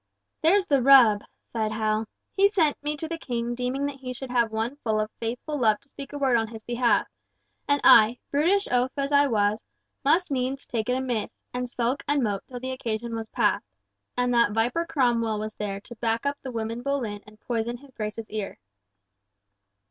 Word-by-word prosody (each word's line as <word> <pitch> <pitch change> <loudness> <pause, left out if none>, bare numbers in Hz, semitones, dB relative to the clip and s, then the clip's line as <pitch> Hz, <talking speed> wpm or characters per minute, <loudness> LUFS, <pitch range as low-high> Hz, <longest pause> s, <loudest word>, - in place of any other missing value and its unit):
"There's 370 +5 +4
the 280 -7 +3
rub!" 240 -6 +7 0.2
sighed 220 -2 -3
Hal. 215 0 0 0.3
"He 395 +1 +6
sent 335 -8 +2
me 295 +1 -2
to 320 +1 -4
the 330 0 -4
King 240 -4 -2
deeming 250 +3 -2
that 285 -1 -4
he 255 -2 -6
should 260 0 -7
have 235 -3 +2
one 225 +5 -2
full 220 -6 -1
of 215 0 -2
faithful 245 +6 -3
love 215 -3 +3
to 275 - -19
speak 275 0 -9
a 290 - -5
word 270 -3 +2
on 225 -1 0
his 220 -1 -10
behalf, 240 0 +2 0.6
and 285 0 +3
I, 225 +2 +7
brutish 350 +8 +2
oaf 250 +1 +2
as 275 0 -1
I 285 0 +5
was, 210 -3 +1 0.4
must 325 +4 +3
needs 265 +1 -1
take 230 0 -3
it 250 - +2
amiss, 245 -5 -2 0.2
and 250 0 -3
sulk 245 +3 -1
and 285 -2 +2
mope 205 -3 -1
till 250 -1 -7
the 260 +1 -4
occasion 235 -2 -3
was 225 0 -5
past, - - +1 0.5
and 245 0 +1
that 235 -3 +3
viper 245 +10 0
Cromwell 240 -8 +1
was 215 +1 -4
there 200 -2 -4
to 240 +3 -9
back 230 +2 -1
up 280 0 -1
the 260 - -6
woman 230 0 -3
Boleyn 245 -7 -2
and 210 0 -16
poison 235 +1 -2
his 275 +2 -17
Grace's 215 -1 -5
ear." 210 -2 -4
245 Hz, 200 wpm, -26 LUFS, 225-275 Hz, 0.6 s, rub